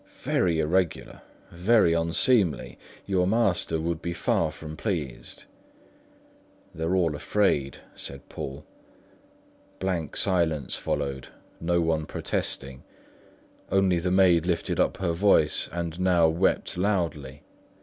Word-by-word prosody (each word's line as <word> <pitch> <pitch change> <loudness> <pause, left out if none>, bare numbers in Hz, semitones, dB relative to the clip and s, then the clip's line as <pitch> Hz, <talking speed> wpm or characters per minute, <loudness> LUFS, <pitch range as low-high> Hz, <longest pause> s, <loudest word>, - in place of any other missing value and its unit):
"Very 85 -3 +1
irregular, 85 +2 -1 0.3
very 90 0 +3
unseemly; 85 - +1 0.3
your 90 -2 +1
master 95 -6 +1
would 85 0 -2
be 85 - -3
far 80 -2 0
from 80 0 -9
pleased." 80 - -4 1.3
"They're 80 +3 -1
all 85 -5 +1
afraid," 75 -6 0 0.2
said 70 0 -8
Poole. 70 +2 -7 1.1
Blank 90 -5 -2
silence 85 -7 +1
followed, 65 -1 -3 0.3
no 85 +1 +1
one 80 -2 0
protesting; 65 -1 -4 0.9
only 95 -3 +3
the 90 +2 -1
maid 90 -3 +4
lifted 85 -2 -1
her 90 -3 +1
voice 85 -4 +3
and 85 0 -4
now 90 -3 +4
wept 85 +2 0
loudly. 80 -8 -2
85 Hz, 110 wpm, -26 LUFS, 80-95 Hz, 1.3 s, maid